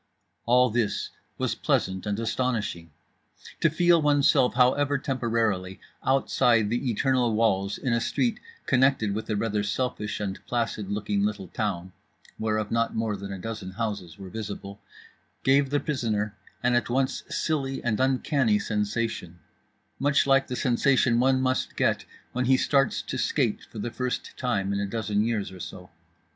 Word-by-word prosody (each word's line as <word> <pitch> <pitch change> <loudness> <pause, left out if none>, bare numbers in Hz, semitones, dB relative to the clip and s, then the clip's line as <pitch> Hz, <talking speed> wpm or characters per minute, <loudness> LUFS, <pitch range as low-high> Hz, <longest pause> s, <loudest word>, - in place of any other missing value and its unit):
All 125 0 +5
this 115 -2 -1 0.3
was - - 0
pleasant 95 +2 0
and 105 +1 -1
astonishing. 115 -7 -2 0.7
To 165 - +4
feel 170 +1 +4
oneself, 145 -4 +4
however 140 +3 +3
temporarily, 115 -8 -1 0.2
outside 120 -4 +3
the 120 +2 0
eternal 120 0 +1
walls 100 -3 +1
in 125 -4 -1
a 115 - +1
street 235 - 0 0.3
connected 130 -5 +3
with 110 +3 -4
a 110 - +1
rather 105 0 0
selfish 105 0 -2
and 100 -2 -4
placid 115 -4 -2
looking 100 -1 -1
little 105 -3 -2
town 95 -5 -3 0.5
(whereof 110 -1 -1
not 115 0 +1
more 110 -2 0
than 100 0 -7
a 95 - -4
dozen 95 -1 -6
houses 100 -7 -4
were 95 -2 -9
visible) 100 -2 -6 0.6
gave 135 +1 +4
the 145 +1 +1
prisoner 110 -9 -1 0.3
an 125 0 +3
at 120 -1 +1
once 130 +2 0
silly 135 -4 -1
and 115 -3 0
uncanny 130 -3 +2
sensation, 105 -3 -2 0.6
much 140 +1 +3
like 135 0 +4
the 125 - -3
sensation 125 -1 +3
one 130 +1 +3
must 130 0 0
get - - +1 0.3
when 125 +1 -1
he 130 +1 +5
starts 135 0 +2
to 130 - -4
skate 115 0 0
for - - -11
the 115 +3 -3
first 125 +1 -3
time 100 -6 -1
in 100 - -1
a 100 - -1
dozen 105 -1 0
years 110 -4 -1
or 95 - -11
so. - - -9
115 Hz, 155 wpm, -26 LUFS, 105-130 Hz, 0.7 s, All